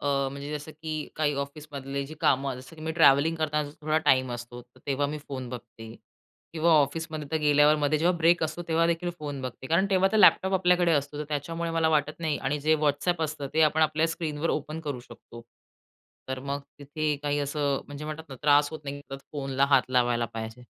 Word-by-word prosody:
अ, 140 Hz, -1 st, 0 dB
म्हणजे 140 Hz, +1 st, -7 dB
जसं 150 Hz, +1 st, -6 dB
की 155 Hz, +1 st, -7 dB, 0.2 s
काही 150 Hz, -1 st, +1 dB
ऑफिसमधले 140 Hz, -1 st, -6 dB
जे 155 Hz, -, -9 dB
कामं 135 Hz, 0 st, +2 dB
जसं 130 Hz, +6 st, -13 dB
की 155 Hz, -, -11 dB
मी 160 Hz, 0 st, -2 dB
ट्रॅव्हलिंग 160 Hz, +1 st, +5 dB
करताना 150 Hz, -2 st, -1 dB
थोडा 155 Hz, +1 st, +1 dB
टाईम 130 Hz, -1 st, +4 dB
असतो 120 Hz, 0 st, -7 dB
तर 125 Hz, +1 st, -25 dB
तेव्हा 140 Hz, 0 st, 0 dB
मी 150 Hz, +1 st, -4 dB
फोन 130 Hz, -3 st, -5 dB
बघते 115 Hz, -2 st, -9 dB, 0.6 s
किंवा 165 Hz, +1 st, +2 dB
ऑफिसमध्ये 155 Hz, 0 st, +1 dB
तर -, -, +3 dB
गेल्यावर 150 Hz, 0 st, +5 dB
मध्ये 150 Hz, +1 st, +1 dB
जेव्हा 175 Hz, +3 st, +2 dB
ब्रेक 170 Hz, +1 st, +4 dB
असतो 155 Hz, +2 st, -4 dB
तेव्हा 165 Hz, 0 st, +3 dB
देखील 170 Hz, +1 st, -1 dB
फोन 145 Hz, -2 st, -5 dB
बघते. 130 Hz, +1 st, -6 dB
कारण 170 Hz, +7 st, +2 dB
तेव्हा 190 Hz, 0 st, +4 dB
तर -, -, +3 dB
लॅपटॉप 190 Hz, -2 st, +6 dB
आपल्याकडे 180 Hz, -2 st, +3 dB
असतो 145 Hz, 0 st, -1 dB
तर 150 Hz, -, -3 dB
त्याच्यामुळे 165 Hz, +3 st, -3 dB
मला 165 Hz, -1 st, +2 dB
वाटत 155 Hz, 0 st, 0 dB
नाही 160 Hz, -3 st, -1 dB
आणि 145 Hz, +2 st, -1 dB
जे 155 Hz, +2 st, +3 dB
WhatsApp 160 Hz, +4 st, +1 dB
असतं 150 Hz, -2 st, -5 dB
ते 160 Hz, -, +4 dB
आपण 155 Hz, +1 st, +3 dB
आपल्या 155 Hz, +1 st, +2 dB
स्क्रीनवर 165 Hz, -1 st, -2 dB
ओपन 155 Hz, +2 st, -3 dB
करू 145 Hz, -5 st, -4 dB
शकतो. 115 Hz, -1 st, -13 dB, 0.9 s
तर 130 Hz, 0 st, -3 dB
मग 140 Hz, +1 st, -3 dB, 0.2 s
तिथे 150 Hz, +1 st, -2 dB
काही 145 Hz, 0 st, 0 dB
असं 145 Hz, -1 st, -1 dB
म्हणजे 145 Hz, +1 st, -8 dB
म्हणतात 155 Hz, +1 st, -6 dB
ना, 135 Hz, -, -8 dB
त्रास 145 Hz, 0 st, +4 dB
होत 155 Hz, -, -7 dB
नाही, 140 Hz, 0 st, -5 dB, 0.3 s
फोनला 135 Hz, -2 st, 0 dB
हात 135 Hz, -2 st, +6 dB
लावायला 120 Hz, -2 st, +2 dB
पाहिजे. 110 Hz, +2 st, -6 dB
150 Hz, 205 wpm, -27 LUFS, 140-160 Hz, 0.9 s, लॅपटॉप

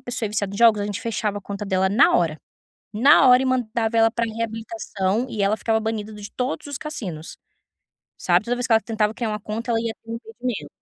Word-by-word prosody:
pessoa 245 Hz, -2 st, -3 dB
é -, -, -4 dB
viciada 200 Hz, -2 st, -2 dB
em -, -, -5 dB
jogos, 225 Hz, -3 st, +5 dB
a -, -, -1 dB
gente 205 Hz, +1 st, -4 dB
fechava 215 Hz, -2 st, -2 dB
a -, -, -11 dB
conta 200 Hz, +1 st, -6 dB
dela 190 Hz, -1 st, +1 dB
na 215 Hz, +8 st, +5 dB
hora, 160 Hz, -3 st, 0 dB, 0.6 s
na 265 Hz, +5 st, +6 dB
hora 250 Hz, +1 st, +7 dB
e -, -, -1 dB
mandava 235 Hz, -3 st, 0 dB
ela 225 Hz, 0 st, +5 dB
pra 230 Hz, +1 st, -1 dB
reabilitação 225 Hz, -, -3 dB
e 210 Hz, -4 st, -3 dB
ela 200 Hz, +2 st, +2 dB
ficava 220 Hz, 0 st, 0 dB
banida 220 Hz, -1 st, -3 dB
do 210 Hz, -, -10 dB
de 205 Hz, -, -8 dB
todos 260 Hz, +4 st, -3 dB
os 285 Hz, -2 st, -5 dB
cassinos. 180 Hz, -, -7 dB, 0.9 s
Sabe, -, -, +3 dB
toda 245 Hz, -, 0 dB
vez 245 Hz, -, -2 dB
que 230 Hz, -, +3 dB
ela 220 Hz, -, +5 dB
tentava 220 Hz, -2 st, -1 dB
criar 225 Hz, -1 st, -3 dB
uma 210 Hz, -, -3 dB
conta 220 Hz, +3 st, -4 dB
ela 225 Hz, -, +2 dB
ia 225 Hz, -1 st, -2 dB
ter 225 Hz, -, -9 dB
um -, -, -2 dB
impedimento 230 Hz, 0 st, -5 dB
225 Hz, 240 wpm, -23 LUFS, 210-235 Hz, 0.9 s, hora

